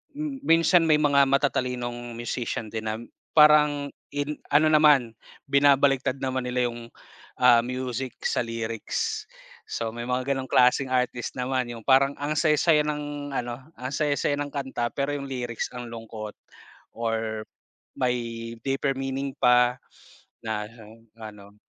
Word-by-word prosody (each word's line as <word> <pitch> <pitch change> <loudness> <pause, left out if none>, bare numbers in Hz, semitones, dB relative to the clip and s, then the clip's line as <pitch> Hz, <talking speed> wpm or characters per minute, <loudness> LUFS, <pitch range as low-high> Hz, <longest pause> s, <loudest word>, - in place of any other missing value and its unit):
m 295 -2 -4
minsan 165 +1 +5
may 150 -1 +4
mga 140 -2 +5
matatalinong 125 -3 -1
musician 120 -2 -4
din 110 0 -4
na 110 - -1 0.4
parang 150 -2 +5 0.2
in 145 +1 -2 0.2
ano 155 +2 +5
naman 145 -7 +5 0.3
binabaliktad 140 -1 +3
naman 130 -1 -2
nila 125 -1 0
yung, 115 0 -10 0.5
ah, 120 -2 +6
music 125 0 -4
sa - - +1
lyrics. 115 - -3 0.4
So, 115 -1 -3
may 120 - -5
mga 130 +2 0
ganong 130 -1 -5
klaseng 130 +1 +4
artist 125 -2 -1
naman, 125 -1 -1
yung 115 -2 -9
parang 135 +1 +5
ang 150 +1 -2
saya 155 -2 +3
saya 155 -3 +4
ng 145 -1 -4
ano 120 0 -3 0.2
ang 130 +1 -4
saya 150 -2 +1
saya 145 - +1
ng 145 0 -3
kanta, 135 -4 -2
pero 140 +1 -1
yung 140 - -6
lyrics 120 -3 -4
ang 120 -1 -6
lungkot 110 -2 -8 0.6
or 110 -1 -2 0.5
may 115 -2 -2
deeper 135 0 0
meaning 135 0 -3
pa 125 0 +4 0.7
na 105 -1 -2 0.5
ano. 105 -2 -11
130 Hz, 140 wpm, -26 LUFS, 120-145 Hz, 0.7 s, ah